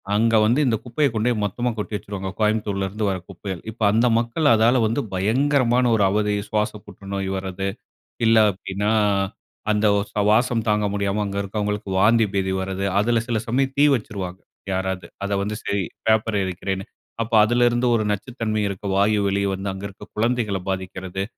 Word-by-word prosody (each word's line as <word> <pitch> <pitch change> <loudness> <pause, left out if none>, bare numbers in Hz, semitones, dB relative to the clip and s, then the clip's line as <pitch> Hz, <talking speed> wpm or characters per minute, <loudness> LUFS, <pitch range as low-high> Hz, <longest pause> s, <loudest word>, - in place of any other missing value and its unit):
அங்க 115 +1 +3
வந்து 120 +7 +3
இந்த 120 -3 +2
குப்பைய 135 +4 +1
கொண்டு 110 +2 +1
போய் 110 -3 -1
மொத்தமா 120 +5 -1
கொட்டி 105 0 -4
வச்சுருவாங்க. 95 0 -5
கோயம்புத்தூர்ல 105 -3 0
இருந்து 105 +2 -3
வர 95 - -1
குப்பைகள், 95 -1 -6
இப்ப 115 - -18
அந்த 115 +4 +3
மக்கள் 120 +7 0
அதால 115 +3 +4
வந்து 115 +6 0
பயங்கரமான 125 +5 +2
ஒரு 105 - +2
அவதி, 105 0 +1
சுவாச 105 0 0
புற்றுநோய் 100 -1 -5
வரது, 95 0 -4 0.6
இல்ல 115 0 +5
அப்டின்னா, 100 +2 -3 0.8
அந்த 105 0 +1
ஓ - - +2
சு 105 - 0
வாசம் 115 +1 +2
தாங்க 105 0 +2
முடியாம 100 +1 -1
அங்க 100 0 -4
இருக்கறவங்களுக்கு 105 0 -3
வாந்தி 115 +2 +5
பேதி 95 -1 0
வரது, 95 +1 -3
அதில 115 +1 +2
சில 115 -2 0
சமயம் 135 +3 0
தீ 145 - +5
வச்சுருவாங்க 95 -5 -5 0.3
யாராது, 95 0 -2 0.2
அத 100 - -2
வந்து 105 +2 -2
சரி 100 -2 -1 0.2
பேப்பர 110 0 +2
எரிக்கிறேனு, 95 +1 -3 0.4
அப்ப 115 +1 -4
அதில 120 +3 +3
இருந்து 120 +1 +1
ஒரு 110 - +1
நச்சுத்தன்மை 110 0 -2
இருக்க 100 +1 -6
வாயு 105 +2 +3
வெளி 100 0 0
வந்து 95 +1 -4
அங்க 95 +1 -8
இருக்க 95 - -14
குழந்தைகள 110 -3 0
பாதிக்கிறது. 95 0 -4
105 Hz, 170 wpm, -22 LUFS, 95-115 Hz, 0.8 s, இல்ல